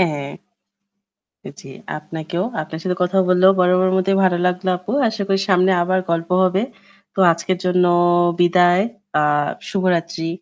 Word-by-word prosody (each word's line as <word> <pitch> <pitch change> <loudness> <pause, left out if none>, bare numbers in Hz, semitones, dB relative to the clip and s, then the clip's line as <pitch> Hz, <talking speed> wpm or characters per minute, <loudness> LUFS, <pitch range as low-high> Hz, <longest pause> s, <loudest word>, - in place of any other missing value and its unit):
হ্যাঁ। 145 -5 -1 1.3
জ্বী 135 - -13 0.3
আপনাকেও। 160 +3 -5 0.2
আপনার 160 +1 -8
সাথে 180 -1 -2
কথা 185 +2 -1
বলেও 185 +1 +5
বরাবরই 180 0 +3
বড় - - -2
মতোই 195 +1 +1
ভালো 180 -2 +2
লাগলো 180 +1 -2
আপু। 185 +3 -8 0.2
আশা 220 -2 -3
করি 195 0 +1
সামনে 185 +1 +3
আবার 185 +1 0
গল্প 165 0 -2
হবে। 185 +2 +1 0.5
তো - - -7
আজকের 175 +3 -3
জন্য 180 0 +2 0.6
বিদায়। 175 +1 +3 0.4
আহ 145 -1 +1 0.2
শুভরাত্রি। 170 -3 -2
180 Hz, 145 wpm, -19 LUFS, 165-185 Hz, 1.3 s, বলেও